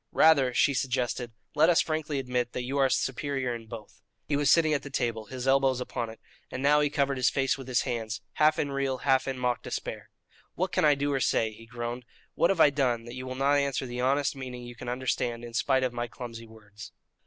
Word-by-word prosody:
"Rather," 140 -5 +5
she 140 +3 +3
suggested, 125 -2 -1 0.2
"let 155 +3 +4
us 175 0 +5
frankly 155 -2 -1
admit 125 -2 -2
that 125 - -3
you 135 +3 -2
are 135 - +5
the - - -5
superior 135 -1 -1
in 115 -1 -8
both." 110 -2 -10 0.2
He 145 - -1
was 145 -1 +2
sitting 160 -2 +5
at 145 - 0
the 140 - -8
table, 115 -5 -2
his 130 +3 -6
elbows 135 -1 +3
upon 120 -2 -4
it, 110 - -11 0.3
and 130 - -5
now 145 +1 +5
he 145 - +2
covered 140 -2 0
his 130 0 +3
face 135 -1 +1
with 135 -2 -10
his 125 -1 +1
hands, 115 -4 -3
half 155 +1 +3
in 145 - -1
real, 135 -1 -1
half 135 -1 +3
in 135 -1 -2
mock, 125 -1 0
despair: - - -5 0.5
"What - - -1
can - - +2
I 150 -1 +5
do 145 +1 -1
or 135 - +1
say?" 110 -3 +1
he 115 +1 -14
groaned. 120 +1 -5 0.3
"What 170 - +2
have 195 - +1
I 150 - +7
done 125 -5 0
that 120 - -8
you 130 0 -6
will 130 - -5
not 140 +2 +3
answer 140 -2 -1
the 125 0 -4
honest 140 +3 +1
meaning 125 -2 -7
you 120 0 -9
can 120 - -7
understand 125 -1 -2
in 120 - -10
spite 130 +1 +2
of 125 -1 -1
my 120 0 -3
clumsy 115 -2 -8
words?" 110 -1 -13
130 Hz, 240 wpm, -28 LUFS, 120-140 Hz, 0.5 s, I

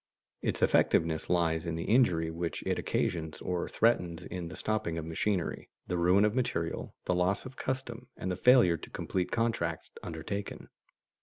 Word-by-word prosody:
Its - - -1
effectiveness 80 -1 +3
lies 85 -1 +1
in 85 - -1
the 85 - -3
injury 90 -9 +3
which 85 -1 -3
it - - 0
occasions 80 -3 -1
or 90 -1 -2
threatens 90 -7 +1
in 90 -2 -5
the 90 - -8
stopping 110 -6 -1
of 80 - -4
machinery, 85 +3 -1 0.2
the 90 - -2
ruin 90 +4 +4
of 105 - +1
material, 100 -10 -2
the - - +1
loss 90 +5 +1
of 130 0 -9
custom, 130 -2 -4
and 95 - -3
the - - -1
failure 120 -9 +5
to - - -11
complete 90 -2 -2
contracts 110 -9 -1
undertaken. 85 +5 -5
90 Hz, 165 wpm, -31 LUFS, 85-110 Hz, 0.2 s, failure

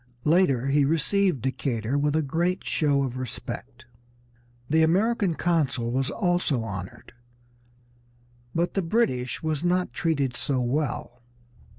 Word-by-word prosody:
Later 150 -6 +3
he 140 +1 +3
received 165 - +1
Decatur 130 -2 -1
with 145 +1 +1
a 160 - +2
great 170 +6 -1
show 145 -3 +1
of 130 -1 -3
respect. 130 -3 -6 0.8
The 160 +2 +3
American 195 +2 +2
consul 140 -10 0
was 130 +2 0
also 175 - 0
honored, 95 0 -7 1.4
but 170 +1 0
the 195 - +1
British 165 - 0
was 155 -1 -1
not 180 +1 +1
treated 140 -6 0
so 135 0 -1
well. 125 -1 -2
150 Hz, 120 wpm, -26 LUFS, 130-175 Hz, 1.4 s, Later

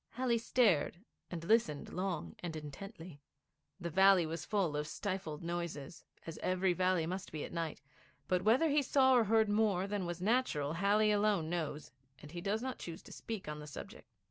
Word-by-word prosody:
Halley 245 -2 +1
stared 215 - +2 0.3
and 170 -2 -5
listened 170 -7 +1
long 180 -3 -3
and 170 -2 -5
intently. 155 +1 -9 0.6
The 170 -2 -4
valley 190 0 +6
was 165 +2 -4
full 190 -8 +1
of 150 0 -2
stifled 185 -5 -4
noises, 170 -2 -5 0.2
as 165 - -7
every 185 0 +1
valley 185 -2 +2
must 185 +3 -4
be 155 -1 -4
at - - -7
night; 165 -2 -3 0.5
but 180 +1 +2
whether 240 - +4
he 295 0 +3
saw 265 -1 +4
or 240 -3 +5
heard 220 +1 +4
more 205 -3 +2
than 200 -3 -2
was 175 0 -4
natural 185 - +1
Halley 205 +4 +3
alone 205 -6 +2
knows, 155 -3 -3 0.3
and 150 +3 -12
he 175 0 -6
does 210 +5 -1
not 260 -1 -4
choose 165 -1 -7
to - - -13
speak 220 -7 -6
on 150 0 -5
the 150 - -9
subject. 195 - -9
185 Hz, 185 wpm, -34 LUFS, 165-210 Hz, 0.6 s, valley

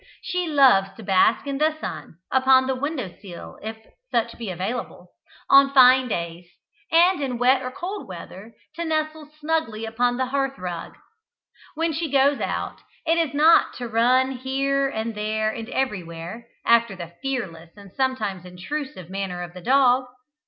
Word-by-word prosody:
She 360 -1 -2
loves 260 -11 +5
to 225 - -10
bask 195 +6 +3
in 280 -1 -3
the 310 0 +2
sun, 165 - -7 0.2
upon 260 0 +5
the 265 - 0
window 260 - -4
sill 180 -4 -10
if 220 +1 -6 0.3
such 235 0 0
be 230 -4 -6
available, 190 +7 -5 0.4
on 275 0 +6
fine 255 0 +7
days, 170 -4 -4 0.4
and 345 0 +4
in 255 -3 -2
wet 255 +2 +3
or 255 - -4
cold 375 +10 -6
weather 190 +4 -10 0.2
to 335 +2 -4
nestle 310 -1 -2
snugly 300 -8 -1
upon 245 +2 0
the 260 - 0
hearthrug. 265 -12 -3 0.8
When 325 +1 0
she 320 +1 -2
goes 280 +1 +3
out, - - -3 0.2
it 330 +1 +2
is 310 -4 -1
not 315 +3 +5
to 245 - -5
run 250 +4 +3
here 275 +1 0
and 225 -2 -3
there 215 +1 -1
and 225 +1 -7
everywhere, 190 -3 -4 0.2
after 235 -3 +3
the 170 -2 -9
fearless 190 -12 -4
and 200 -2 -13
sometimes 220 -9 -1
intrusive 185 - -6
manner 190 -1 -4
of 175 0 -9
the 180 - -10
dog. 255 +2 +4
250 Hz, 160 wpm, -23 LUFS, 200-275 Hz, 0.8 s, fine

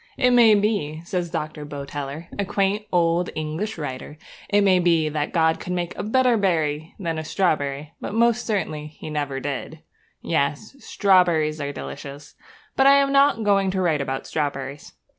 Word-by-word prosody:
'It 250 -2 +3
may 235 -3 +6
be,' 200 -8 0
says 175 -1 -2
Dr. 155 -2 -4
Boteler, 145 +2 -6
a - - +2
quaint 200 +2 -1
old 175 0 +2
English 155 +8 -3
writer, 145 0 -6 0.3
'it 205 0 +4
may 190 -2 +4
be 165 -3 +2
that 150 -1 -2
God 160 -1 +2
could 180 - -5
make 175 -1 -3
a - - -4
better 245 +2 +2
berry 160 -5 -1
than 165 -5 -3
a - - -4
strawberry, 150 -4 -1
but - - -5
most 235 +1 +2
certainly 155 -8 -2
He 155 0 -10
never 145 -3 -2
did.' 145 +3 -5 0.4
Yes, 155 - -2
strawberries 170 - +2
are 140 0 -3
delicious; 140 0 -8 0.4
but 270 - +4
I 275 - +8
am 280 0 +3
not 275 -4 +4
going 200 -2 +3
to 190 0 -1
write 160 -5 +1
about 135 -1 -3
strawberries. 140 -2 -4
165 Hz, 170 wpm, -23 LUFS, 150-200 Hz, 0.4 s, I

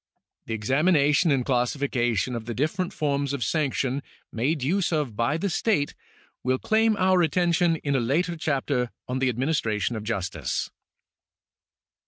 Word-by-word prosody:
The 115 - -2
examination 145 - +3
and 135 -4 +2
classification 125 -2 0
of 115 -1 -5
the 120 -1 -4
different 175 - -1
forms 140 -5 -1
of 135 -4 -2
sanction 140 -3 0 0.3
made 135 +5 -1
use 180 +7 +1
of 150 -9 -1
by 115 +8 +1
the 200 - -1
state 170 -4 0 0.5
will 130 +1 +1
claim 220 +5 +2
our 185 -1 +3
attention 170 +1 +2
in 145 -3 -2
a - - +3
later 160 +9 0
chapter 140 -5 -1 0.2
on 125 +1 -2
the 130 -1 +2
administration 120 -4 0
of 110 - -5
justice. 95 - -3
140 Hz, 145 wpm, -25 LUFS, 120-165 Hz, 0.5 s, examination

